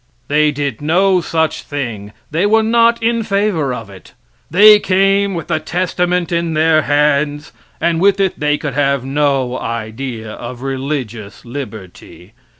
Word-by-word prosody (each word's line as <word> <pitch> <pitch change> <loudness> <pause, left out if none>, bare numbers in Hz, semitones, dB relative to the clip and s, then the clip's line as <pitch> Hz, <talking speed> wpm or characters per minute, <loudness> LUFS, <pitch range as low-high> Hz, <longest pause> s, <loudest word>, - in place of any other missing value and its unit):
They 150 +1 +3
did 140 -4 -4
no 180 +4 +2
such 160 -1 -1
thing. 115 -8 -5 0.2
They 170 +7 +1
were 220 +1 +3
not 230 +1 +3
in 230 0 +1
favor 200 -9 0
of 115 -4 -6
it. 95 -2 -15 0.3
They 210 +5 +7
came 195 0 +2
with 165 - -4
the - - 0
Testament 180 0 -1
in 170 -1 -1
their 155 0 +3
hands, 145 0 0 0.3
and 170 -1 0
with 200 0 +3
it 195 -2 0
they 150 0 +1
could 145 -3 -5
have 140 -2 0
no 135 -2 0
idea 115 0 -5
of 120 +3 -8
religious 130 -7 -5
liberty. 110 -6 -9
150 Hz, 150 wpm, -16 LUFS, 130-185 Hz, 0.3 s, They